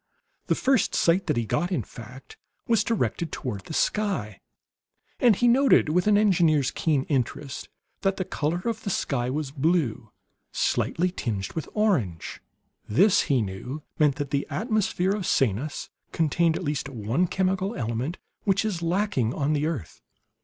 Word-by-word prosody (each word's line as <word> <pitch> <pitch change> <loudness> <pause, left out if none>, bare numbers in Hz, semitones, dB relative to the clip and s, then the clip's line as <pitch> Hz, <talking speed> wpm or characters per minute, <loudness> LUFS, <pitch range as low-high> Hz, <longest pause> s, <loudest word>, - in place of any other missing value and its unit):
The - - +2
first 265 -3 +2
sight 175 +3 +2
that 150 -6 +1
he 120 - 0
got, 175 - -1
in 180 - 0
fact, 125 +2 -12 0.3
was 225 -3 +3
directed 195 -7 -1
toward 110 -7 -5
the - - -7
sky; 190 - -1 0.8
and 235 -4 +5
he 245 - +2
noted 260 - +5
with 180 +5 +1
an 210 -1 +5
engineer's 165 -9 +3
keen 150 -5 +1
interest 135 0 -3 0.3
that 195 -1 +1
the 185 - -2
color 160 +3 -2
of 230 -2 -2
the 205 - -4
sky 125 -9 -1
was 145 0 -3
blue, 135 -7 0 0.4
slightly 180 +2 0
tinged 105 - -3
with 160 - -4
orange. 145 - 0 0.5
This, 195 - +5
he 130 -5 +3
knew, 125 +10 -6 0.2
meant 150 -3 +4
that 140 0 -4
the 140 0 0
atmosphere 210 -3 0
of 200 -4 -3
Sanus 135 +4 0 0.2
contained 165 +1 +2
at - - -4
least 145 -1 -2
one 125 - 0
chemical 190 +3 0
element 120 +7 -2 0.3
which 200 +1 +2
is 190 -6 -2
lacking 170 - 0
on 145 +1 0
the 150 +1 +1
earth. 145 - -5
160 Hz, 160 wpm, -26 LUFS, 130-190 Hz, 0.8 s, and